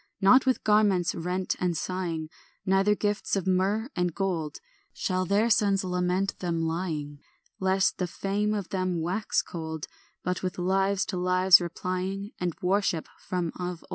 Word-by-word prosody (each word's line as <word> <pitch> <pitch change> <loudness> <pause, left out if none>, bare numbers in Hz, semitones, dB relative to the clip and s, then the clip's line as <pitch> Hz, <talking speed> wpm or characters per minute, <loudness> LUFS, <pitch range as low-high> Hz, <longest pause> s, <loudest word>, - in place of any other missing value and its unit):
Not 255 +7 +6
with 260 - +2
garments 210 -5 +3
rent 180 +2 -2
and 175 -2 0
sighing, 170 -4 -3 0.4
Neither 195 +2 +3
gifts 205 0 -1
of 195 - -1
myrrh 190 +5 +1
and 180 -2 0
gold, 170 -7 -2 0.4
Shall 185 -1 -1
their 210 +5 +2
sons 200 -2 +3
lament 180 +1 -1
them 170 -2 -1
lying, 160 -3 -3 0.4
Lest 190 0 +2
the 180 - 0
fame 205 +4 -1
of 200 -3 -4
them 185 -2 -1
wax 180 +6 0
cold; 160 -2 -5 0.4
But 180 0 -2
with 185 -1 -3
lives 195 +2 +1
to - - -1
lives 185 0 +6
replying, 185 +3 -3
And 180 -2 -1
a - - -7
worship 185 -3 +1
from 180 -2 -2
of 180 -1 -4
old. - - -21
185 Hz, 160 wpm, -27 LUFS, 175-195 Hz, 0.4 s, Not